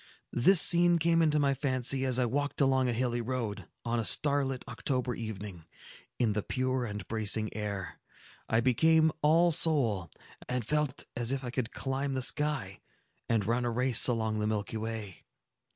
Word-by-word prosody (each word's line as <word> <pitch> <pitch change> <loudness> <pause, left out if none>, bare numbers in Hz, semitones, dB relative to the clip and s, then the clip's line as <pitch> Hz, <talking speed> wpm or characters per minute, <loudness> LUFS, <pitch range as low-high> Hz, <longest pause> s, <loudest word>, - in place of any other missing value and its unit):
This 175 +10 +6
scene 175 0 +6
came 165 0 +2
into 155 -2 +2
my 140 -2 +2
fancy 130 -1 0
as 130 -2 +2
I 125 - +2
walked 145 +4 -2
along 130 -2 +2
a - - +1
hilly 120 0 -1
road, 115 -4 -4 0.2
on 120 0 -1
a - - -1
starlight 140 +1 +1
October 125 -2 -2
evening; 105 -7 -7 0.5
in 115 -4 +1
the 105 - -1
pure 130 +2 -2
and 105 -5 -7
bracing 110 0 -1
air, 100 -4 -5 0.5
I 115 +1 +2
became 160 +6 +3
all 165 +3 +4
soul, 125 - +2 0.4
and 125 -3 -2
felt 150 0 -2
as 120 0 -1
if 135 -1 -3
I 125 - -5
could 125 -2 -3
climb 135 +1 -3
the 130 - 0
sky, 125 -6 -1 0.5
and 110 -4 +1
run 120 +3 0
a 120 - -1
race 125 0 +3
along 110 -3 -1
the 105 - -1
Milky 105 0 -3
Way. 110 -4 -6
125 Hz, 170 wpm, -30 LUFS, 110-140 Hz, 0.5 s, This